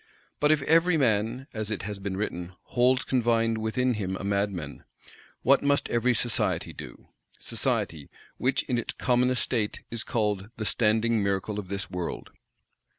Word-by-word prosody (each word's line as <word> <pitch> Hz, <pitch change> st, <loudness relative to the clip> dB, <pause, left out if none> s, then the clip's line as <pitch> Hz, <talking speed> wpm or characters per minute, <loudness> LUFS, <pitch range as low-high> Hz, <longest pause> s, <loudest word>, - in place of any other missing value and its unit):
But 150 Hz, +1 st, +4 dB
if 150 Hz, -3 st, +3 dB
"every 165 Hz, +3 st, +4 dB
man," 115 Hz, 0 st, +1 dB
as 110 Hz, -1 st, -4 dB
it 110 Hz, -, -3 dB
has 105 Hz, -1 st, -5 dB
been 95 Hz, -1 st, -4 dB
written, 90 Hz, -3 st, -3 dB
"holds 130 Hz, +1 st, +2 dB
confined 115 Hz, -3 st, +1 dB
within 125 Hz, +3 st, +1 dB
him 95 Hz, -3 st, -3 dB
a -, -, -6 dB
mad 100 Hz, +1 st, +1 dB
man," 80 Hz, -7 st, -7 dB, 0.6 s
what 135 Hz, +1 st, +5 dB
must 140 Hz, 0 st, +2 dB
every 120 Hz, +1 st, +2 dB
Society 120 Hz, +1 st, 0 dB
do;—Society, 70 Hz, +4 st, -4 dB, 0.3 s
which 130 Hz, +2 st, +1 dB
in 125 Hz, -2 st, -1 dB
its -, -, -4 dB
commonest 125 Hz, 0 st, +2 dB
state 110 Hz, -4 st, -1 dB
is 115 Hz, -2 st, -2 dB
called 105 Hz, -3 st, -1 dB
"the 110 Hz, -, -3 dB
standing 110 Hz, +1 st, +2 dB
miracle 100 Hz, +1 st, -1 dB
of 100 Hz, -, -6 dB
this 100 Hz, 0 st, -4 dB
world"! 90 Hz, -2 st, -4 dB
110 Hz, 155 wpm, -27 LUFS, 100-125 Hz, 0.6 s, what